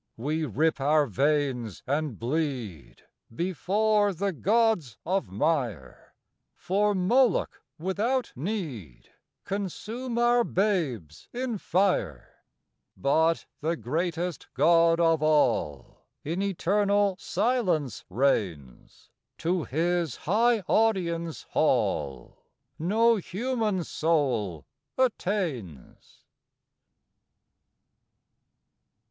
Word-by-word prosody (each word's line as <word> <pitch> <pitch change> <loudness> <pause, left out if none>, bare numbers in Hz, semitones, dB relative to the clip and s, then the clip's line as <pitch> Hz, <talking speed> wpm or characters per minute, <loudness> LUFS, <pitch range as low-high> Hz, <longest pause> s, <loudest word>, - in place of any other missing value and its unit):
We 155 +6 -1
rip 150 +4 0
our 150 +2 +3
veins 135 -3 -1
and 145 -3 -2
bleed 125 - -4 0.3
Before 200 - +1
the 195 +3 -1
gods 205 - +1
of 190 - -1
mire; 105 - -2 0.4
For 205 +2 0
Moloch, 225 +4 +2 0.2
without 215 +9 -1
need, 135 - -5 0.3
Consume 215 +5 -4
our 240 0 +4
babes 160 - -2
in 245 -3 -3
fire; 180 - -1 0.5
But 160 +4 +2
the 160 +3 -1
greatest 170 - -3
God 165 0 +4
of 165 -2 +3
all 125 - +1 0.2
In 170 +6 -2
eternal 200 +1 +1
silence 185 - 0
reigns; 90 - -2 0.3
To 175 -1 -1
His 170 0 0
high 225 +5 +2
audience 175 -6 0
hall 70 -4 0 0.4
No 225 +7 +3
human 210 -1 -2
soul 130 - -1 0.3
attains. 175 - -3
170 Hz, 80 wpm, -27 LUFS, 135-205 Hz, 0.5 s, our